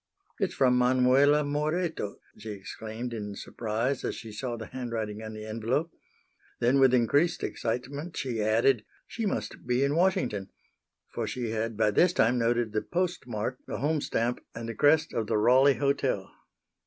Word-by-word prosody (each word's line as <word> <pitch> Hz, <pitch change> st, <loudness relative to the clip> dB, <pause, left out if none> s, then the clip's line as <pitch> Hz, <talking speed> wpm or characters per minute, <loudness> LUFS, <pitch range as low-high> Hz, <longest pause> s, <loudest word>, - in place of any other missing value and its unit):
"It's 195 Hz, -4 st, -1 dB
from 125 Hz, -2 st, +4 dB
Manuela 130 Hz, +4 st, +4 dB
Moreto!" 150 Hz, -, -1 dB, 0.2 s
she 110 Hz, +1 st, -9 dB
exclaimed 110 Hz, +4 st, -6 dB
in 105 Hz, -3 st, -5 dB
surprise 115 Hz, +6 st, -2 dB
as -, -, -2 dB
she 115 Hz, -1 st, -8 dB
saw 120 Hz, +3 st, -4 dB
the 110 Hz, -, -6 dB
handwriting 110 Hz, -4 st, -4 dB
on 110 Hz, 0 st, -7 dB
the 110 Hz, 0 st, -7 dB
envelope. 115 Hz, +9 st, -1 dB, 0.7 s
Then, 125 Hz, +4 st, +3 dB
with 135 Hz, -2 st, +6 dB
increased 135 Hz, +7 st, +2 dB
excitement, 140 Hz, +8 st, -3 dB
she 120 Hz, -5 st, -2 dB
added 110 Hz, +2 st, +3 dB, 0.2 s
"She 225 Hz, -2 st, -3 dB
must 190 Hz, -, -4 dB
be 125 Hz, +2 st, +2 dB
in 140 Hz, +1 st, +2 dB
Washington," 125 Hz, -, +1 dB, 0.6 s
for -, -, -2 dB
she 120 Hz, -3 st, -3 dB
had 115 Hz, 0 st, -2 dB
by 110 Hz, -1 st, +3 dB
this 175 Hz, -, +4 dB
time 120 Hz, -2 st, +3 dB
noted 115 Hz, -1 st, +1 dB
the 110 Hz, -, +1 dB
postmark, 130 Hz, -, -2 dB
the -, -, -4 dB
home 150 Hz, +1 st, 0 dB
stamp 120 Hz, -1 st, -1 dB
and 115 Hz, 0 st, -5 dB
the 115 Hz, -, -4 dB
crest 155 Hz, +6 st, +3 dB
of 110 Hz, -2 st, -1 dB
the 110 Hz, -, +1 dB
Raleigh 130 Hz, +5 st, +5 dB
Hotel. 140 Hz, 0 st, 0 dB
125 Hz, 165 wpm, -28 LUFS, 110-140 Hz, 0.7 s, with